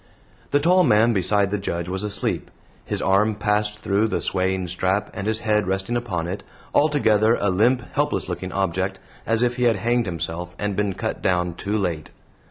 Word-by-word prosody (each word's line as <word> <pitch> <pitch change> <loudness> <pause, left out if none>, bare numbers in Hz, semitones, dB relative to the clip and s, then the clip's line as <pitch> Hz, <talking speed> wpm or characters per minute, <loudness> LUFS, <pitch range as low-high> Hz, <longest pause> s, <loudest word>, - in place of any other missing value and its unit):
The 145 - +3
tall 180 +5 +4
man 115 -3 +4
beside 100 +1 +2
the 105 - -1
Judge 85 -3 -3
was 95 +1 -3
asleep, 105 -1 -1 0.4
his - - -3
arm 105 +3 +3
passed 105 0 0
through 100 +3 +2
the - - -1
swaying 95 -1 0
strap 95 +3 0
and 100 - -4
his 110 0 0
head 105 -3 +1
resting 95 +5 -1
upon 100 -9 -2
it 95 +2 -4 0.3
altogether 115 -7 +3
a 100 - +1
limp, 120 +7 +2
helpless 145 +1 0
looking 90 +1 -4
object, 95 0 -1 0.3
as 115 +1 +2
if 120 0 0
he 125 - +1
had 115 -2 +4
hanged 120 +3 0
himself 90 +1 -4
and 105 -1 -2
been 100 -1 0
cut - - -3
down 90 -1 +1
too 100 +5 -2
late. 85 -7 -2
100 Hz, 185 wpm, -23 LUFS, 95-110 Hz, 0.4 s, tall